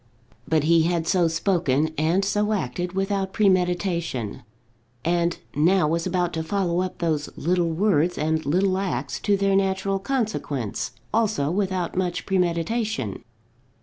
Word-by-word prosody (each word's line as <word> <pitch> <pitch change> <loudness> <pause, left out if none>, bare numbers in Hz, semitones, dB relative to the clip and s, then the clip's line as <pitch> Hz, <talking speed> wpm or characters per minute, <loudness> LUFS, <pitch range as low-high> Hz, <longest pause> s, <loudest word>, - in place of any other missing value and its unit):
But 160 -2 +2
he 165 +1 +4
had 170 0 0
so 180 -1 +3
spoken 160 -3 +1
and 165 +6 +1
so 210 +2 +1
acted 175 +1 -2
without 195 0 -1
premeditation, 180 - 0 0.6
and 170 0 +1 0.2
now 170 +3 +3
was 165 +3 0
about 180 -1 0
to 160 - -1
follow 180 0 0
up 185 0 -4
those 155 -4 -1
little 175 +1 +1
words 175 -1 +1
and 160 +1 0
little 185 +5 +1
acts 135 -9 -2
to 200 -1 +2
their 195 0 +2
natural 195 0 +1
consequence, 195 - -2 0.2
also 215 -10 +1
without 185 -2 -1
much 180 -1 -1
premeditation. 180 - -1
175 Hz, 135 wpm, -24 LUFS, 160-195 Hz, 0.6 s, he